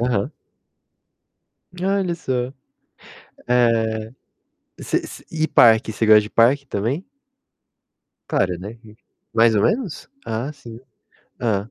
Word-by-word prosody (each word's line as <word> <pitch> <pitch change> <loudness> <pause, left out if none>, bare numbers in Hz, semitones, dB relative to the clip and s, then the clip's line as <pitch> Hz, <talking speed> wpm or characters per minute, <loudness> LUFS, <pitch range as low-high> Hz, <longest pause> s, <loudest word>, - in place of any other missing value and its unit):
Aham. 120 -5 0 1.5
Olha 190 -1 0
só. 130 -4 -2 0.9
Eh, 115 -2 +1 0.7
você - - -1
você - - -11
e 160 -1 0
parque, 110 -4 +5
você 110 - -1
gosta 110 0 +8
de 105 - -9
parque 130 +5 +3
também? 130 - -2 1.2
Claro, 90 -2 0
né. 105 +6 -9
Hum, 105 - -14 0.4
mais 115 0 +4
ou 100 - +2
menos? 220 - -1 0.2
Ah, 115 +6 -3
sim. 115 -5 -12 0.6
Hã. 110 -2 -1
115 Hz, 115 wpm, -21 LUFS, 110-135 Hz, 1.5 s, gosta